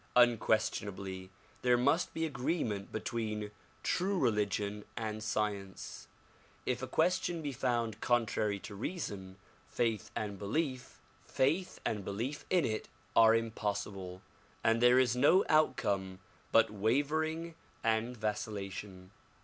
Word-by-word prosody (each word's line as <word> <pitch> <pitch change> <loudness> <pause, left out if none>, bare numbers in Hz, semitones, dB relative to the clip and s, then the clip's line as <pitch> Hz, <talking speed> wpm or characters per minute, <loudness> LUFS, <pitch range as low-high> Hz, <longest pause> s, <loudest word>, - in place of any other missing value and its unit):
Unquestionably 100 -5 +2 0.3
there 125 -1 +4
must 140 +8 +2
be 160 - -1
agree 150 +3 -1
ment 100 -3 -4
between 110 -1 -3 0.3
true 195 +2 +1
religion 105 - 0
and 110 -2 -3
science. 105 -3 -3 0.6
If - - -1
a - - -3
question 175 -2 +1
be 145 - -2
found 120 -4 -1
contrary 110 -4 +1
to - - -8
reason, 100 - -5 0.3
faith 115 -3 -1
and 100 -2 -3
belief 130 +4 -2 0.4
in 130 - 0
it 110 -1 -2 0.3
are 115 0 +7
impossible 100 -4 -3 0.4
and 115 +1 +3
there 125 +1 +7
is 125 -2 +4
no 175 +9 +5
outcome 100 -11 +2 0.3
but - - +5
wavering 155 +10 0 0.3
and 115 +2 +1
vacillation. 100 -3 -4
110 Hz, 110 wpm, -33 LUFS, 100-130 Hz, 0.6 s, are